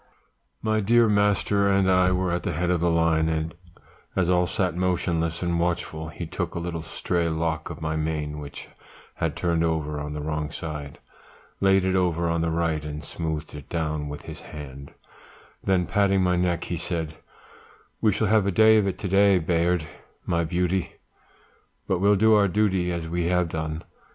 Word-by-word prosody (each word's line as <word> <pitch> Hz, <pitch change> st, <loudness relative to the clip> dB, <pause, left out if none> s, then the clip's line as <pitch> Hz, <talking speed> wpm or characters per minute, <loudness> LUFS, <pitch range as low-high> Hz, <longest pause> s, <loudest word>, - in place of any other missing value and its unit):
"My 110 Hz, 0 st, +1 dB
dear 115 Hz, +3 st, +4 dB
master 100 Hz, -1 st, +2 dB
and 95 Hz, -1 st, +3 dB
I 90 Hz, 0 st, +4 dB
were 90 Hz, -1 st, 0 dB
at 85 Hz, 0 st, 0 dB
the -, -, -2 dB
head 90 Hz, +4 st, 0 dB
of 90 Hz, -2 st, +1 dB
the 85 Hz, -, +3 dB
line, 80 Hz, -1 st, +2 dB
and 80 Hz, 0 st, -2 dB, 0.6 s
as 90 Hz, -1 st, +2 dB
all 90 Hz, 0 st, +3 dB
sat 90 Hz, -2 st, -1 dB
motionless 85 Hz, -2 st, 0 dB
and 85 Hz, -1 st, 0 dB
watchful, 85 Hz, -2 st, -2 dB
he 85 Hz, +2 st, -6 dB
took -, -, -4 dB
a -, -, -1 dB
little 85 Hz, -1 st, -4 dB
stray 85 Hz, +1 st, -1 dB
lock 80 Hz, -1 st, -2 dB
of -, -, -8 dB
my 80 Hz, 0 st, -1 dB
mane 75 Hz, -1 st, -2 dB
which 70 Hz, -1 st, -9 dB, 0.5 s
had -, -, -1 dB
turned 85 Hz, -2 st, 0 dB
over 75 Hz, -2 st, -1 dB
on 75 Hz, 0 st, -5 dB
the 75 Hz, -, -4 dB
wrong 75 Hz, 0 st, -2 dB
side, 75 Hz, -3 st, -6 dB, 0.6 s
laid 95 Hz, -1 st, +4 dB
it 95 Hz, 0 st, +1 dB
over 85 Hz, -2 st, +1 dB
on 85 Hz, 0 st, 0 dB
the 85 Hz, -, 0 dB
right, 80 Hz, -2 st, 0 dB
and 75 Hz, +1 st, -6 dB
smoothed 80 Hz, -2 st, -4 dB
it 75 Hz, -2 st, -10 dB
down 75 Hz, -3 st, -2 dB
with 75 Hz, -, -7 dB
his -, -, -8 dB
hand; 70 Hz, -2 st, -9 dB, 0.7 s
then 95 Hz, -2 st, +2 dB
patting 100 Hz, -1 st, +2 dB
my 90 Hz, -1 st, +2 dB
neck, 90 Hz, -1 st, 0 dB
he 85 Hz, -, -3 dB
said, 80 Hz, -2 st, -3 dB, 0.8 s
'We 110 Hz, -, +4 dB
shall 110 Hz, -, 0 dB
have 105 Hz, -1 st, +3 dB
a -, -, +2 dB
day 110 Hz, +3 st, +6 dB
of 105 Hz, -2 st, +2 dB
it 95 Hz, -, -2 dB
to 100 Hz, 0 st, -4 dB
day, 100 Hz, +1 st, +5 dB
Bayard, 85 Hz, 0 st, +1 dB, 0.4 s
my 85 Hz, 0 st, +1 dB
beauty; 90 Hz, +2 st, -1 dB, 0.9 s
but 95 Hz, -, +1 dB
we'll 100 Hz, +2 st, +4 dB
do 110 Hz, +3 st, +5 dB
our 105 Hz, -2 st, +5 dB
duty 95 Hz, -2 st, +1 dB
as 85 Hz, -2 st, -3 dB
we 85 Hz, +1 st, -1 dB
have 90 Hz, -1 st, +1 dB
done.' 80 Hz, 0 st, -4 dB
85 Hz, 190 wpm, -25 LUFS, 80-95 Hz, 0.9 s, day